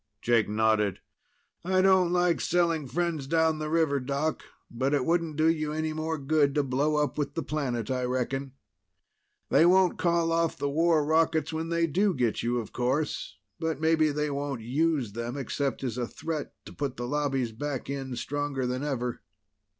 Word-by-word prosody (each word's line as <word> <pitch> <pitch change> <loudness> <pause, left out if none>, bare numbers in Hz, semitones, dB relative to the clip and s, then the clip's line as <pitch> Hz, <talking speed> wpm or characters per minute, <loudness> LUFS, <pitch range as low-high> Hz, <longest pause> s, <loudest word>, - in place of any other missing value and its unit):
Jake 115 -3 +3
nodded. 105 -2 +2 0.6
"I 185 +1 +2
don't 190 -2 +4
like 175 -1 +2
selling 165 -4 +1
friends 160 0 -2
down 160 0 +2
the 155 0 -3
river, 160 -3 +2
Doc. 140 +4 -2 0.3
But 130 +4 0
it 135 -3 0
wouldn't 165 -2 0
do 155 +1 +3
you 155 -2 +1
any 155 0 -2
more 160 +1 -2
good 140 0 +2
to 145 - +3
blow 140 +3 0
up 150 -1 0
with 145 - -2
the 165 - -2
planet, 130 -6 -2
I 125 -1 0
reckon. 130 +2 -2 1.0
They - - +5
won't 180 +1 +4
call 170 -1 +2
off 165 0 +1
the 140 - -1
war 160 0 +3
rockets 160 0 +2
when 160 +1 -3
they 170 0 +2
do 185 +4 +1
get 120 -4 0
you, 120 +1 0
of 115 -3 -5
course. 130 -4 -1 0.2
But 160 -3 -2
maybe 160 -1 +3
they 150 0 -1
won't 140 -3 -3
use 135 0 0
them, 120 +4 -4
except 140 0 -2
as 125 -2 -2
a 120 - -1
threat 155 +2 -5
to - - -10
put 140 -3 -3
the 120 - -3
Lobbies 135 -4 0
back 135 +3 -4
in, 135 -2 -4
stronger 140 +1 -2
than 125 +2 -2
ever." 125 -4 -2
145 Hz, 180 wpm, -28 LUFS, 130-160 Hz, 1.0 s, They